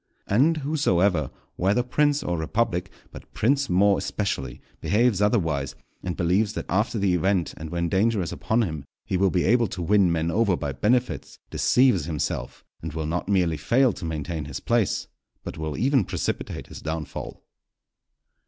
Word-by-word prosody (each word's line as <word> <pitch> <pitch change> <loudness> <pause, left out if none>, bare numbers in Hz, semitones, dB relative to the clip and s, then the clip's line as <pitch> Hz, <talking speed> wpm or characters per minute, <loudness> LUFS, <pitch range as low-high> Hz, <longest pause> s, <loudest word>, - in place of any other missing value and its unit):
And, 145 +11 +3
whosoever, 95 - +2 0.3
whether 100 +7 +2
prince 145 +3 +1
or 90 - -1
republic, 90 +2 -1 0.2
but - - -12
prince 140 +5 +1
more 100 +2 +4
especially, 95 -10 -3 0.2
behaves 110 -1 +2
otherwise, 80 - +1 0.3
and 90 -1 -4
believes 95 +4 +1
that - - -4
after 105 +5 0
the 100 -3 +2
event 90 0 +1
and 80 0 -7
when 85 +1 -1
danger 105 +5 +2
is 85 - -5
upon 115 +2 0
him 80 -8 -4 0.2
he - - -2
will 95 +1 +3
be 90 -1 +1
able 115 +2 +3
to 90 - -6
win 95 0 +4
men 85 0 0
over 105 -2 +2
by 70 - -3
benefits, 85 - 0
deceives 125 - +3
himself, 75 -3 -4 0.2
and 80 -2 -6
will 80 -1 -3
not 90 +4 -3
merely 90 -5 +2
fail 120 - +3
to - - -10
maintain 80 -1 -4
his 70 - -6
place, 115 -4 0 0.4
but - - -7
will 80 -2 -3
even 135 -2 +3
precipitate - - -3
his - - -11
downfall. 80 -1 -5
95 Hz, 165 wpm, -25 LUFS, 80-115 Hz, 0.4 s, more